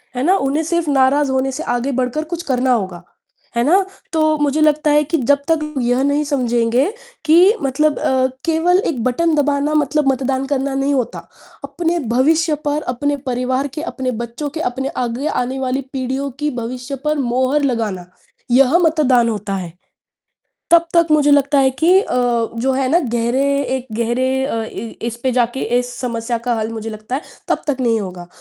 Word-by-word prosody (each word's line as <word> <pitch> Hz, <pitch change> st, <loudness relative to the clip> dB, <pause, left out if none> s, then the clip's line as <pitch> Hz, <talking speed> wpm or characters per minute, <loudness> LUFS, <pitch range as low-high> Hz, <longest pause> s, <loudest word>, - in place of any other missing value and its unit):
है 250 Hz, -, -1 dB
ना? 370 Hz, +5 st, +4 dB
उन्हें 280 Hz, +4 st, 0 dB
सिर्फ़ 335 Hz, -1 st, -1 dB
नाराज़ 270 Hz, +1 st, +3 dB
होने 265 Hz, 0 st, 0 dB
से 310 Hz, +5 st, -5 dB
आगे 245 Hz, +3 st, -1 dB
बढ़कर 255 Hz, +5 st, -1 dB
कुछ 345 Hz, 0 st, -4 dB
करना 255 Hz, -2 st, 0 dB
होगा। 185 Hz, -6 st, -3 dB, 0.5 s
है 235 Hz, -, +2 dB
ना? 375 Hz, +7 st, +3 dB, 0.3 s
तो 310 Hz, -1 st, +2 dB
मुझे 295 Hz, +1 st, 0 dB
लगता 305 Hz, 0 st, +3 dB
है 300 Hz, 0 st, +4 dB
कि 325 Hz, +3 st, -1 dB
जब 280 Hz, +2 st, +2 dB
तक 325 Hz, -, +3 dB, 0.2 s
यह 245 Hz, +2 st, +1 dB
नहीं 285 Hz, +1 st, +1 dB
समझेंगे 240 Hz, -2 st, +1 dB, 0.4 s
कि 355 Hz, +8 st, +6 dB
मतलब 290 Hz, +3 st, +1 dB
अ, 260 Hz, 0 st, +2 dB, 0.2 s
केवल 335 Hz, +3 st, +3 dB
एक 240 Hz, -6 st, -4 dB
बटन 315 Hz, +6 st, +1 dB
दबाना 290 Hz, +1 st, +1 dB
मतलब 300 Hz, -1 st, +1 dB
मतदान 265 Hz, 0 st, -1 dB
करना 275 Hz, -1 st, -1 dB
नहीं 275 Hz, +1 st, +1 dB
होता, 255 Hz, -4 st, -3 dB, 0.4 s
अपने 345 Hz, 0 st, -1 dB
भविष्य 310 Hz, +4 st, +3 dB
पर, 295 Hz, +1 st, 0 dB
अपने 285 Hz, +3 st, -1 dB
परिवार 255 Hz, +2 st, -1 dB
के, 310 Hz, -, -3 dB
अपने 260 Hz, -6 st, -3 dB
बच्चों 235 Hz, +5 st, -5 dB
के, 315 Hz, -, -7 dB
अपने 265 Hz, +2 st, -4 dB, 0.2 s
आगे 245 Hz, +6 st, -3 dB
आने 260 Hz, +2 st, -2 dB
वाली 265 Hz, +1 st, -1 dB
पीढ़ियों 265 Hz, +1 st, -2 dB
की 300 Hz, 0 st, 0 dB
भविष्य 250 Hz, +3 st, -5 dB
पर 300 Hz, 0 st, +1 dB
मोहर 260 Hz, +2 st, +1 dB
लगाना, 220 Hz, -9 st, -1 dB, 0.5 s
यह 270 Hz, +6 st, +5 dB
मतदान 280 Hz, -8 st, +3 dB
होता 210 Hz, -2 st, -3 dB
है। 175 Hz, -3 st, -6 dB, 1.0 s
तब 340 Hz, 0 st, +5 dB
तक 335 Hz, -1 st, +5 dB
मुझे 295 Hz, -1 st, +4 dB
लगता 285 Hz, 0 st, +4 dB
है 265 Hz, -1 st, +4 dB
कि 335 Hz, +8 st, +4 dB
अ, -, -, -4 dB, 0.5 s
जो 265 Hz, +2 st, +1 dB
है 265 Hz, 0 st, 0 dB
ना, 335 Hz, +5 st, +4 dB, 0.2 s
गहरे 240 Hz, +3 st, +1 dB, 0.3 s
एक 255 Hz, -, -7 dB
गहरे 260 Hz, +3 st, 0 dB
अ, 230 Hz, -5 st, -2 dB
इ 225 Hz, 0 st, -7 dB
इस 235 Hz, 0 st, -4 dB
पे 260 Hz, -1 st, +1 dB
जाके, 245 Hz, +1 st, 0 dB, 0.2 s
इस 245 Hz, 0 st, -3 dB
समस्या 235 Hz, -1 st, -2 dB
का 240 Hz, -, +2 dB
हल, 220 Hz, 0 st, -2 dB
मुझे 225 Hz, 0 st, -5 dB
लगता 215 Hz, +3 st, -6 dB
है, 290 Hz, -, -5 dB, 0.3 s
तब -, -, 0 dB
तक 290 Hz, -3 st, 0 dB
नहीं 230 Hz, -2 st, +2 dB
होगा, 180 Hz, -3 st, -7 dB
270 Hz, 185 wpm, -18 LUFS, 245-300 Hz, 1.0 s, कि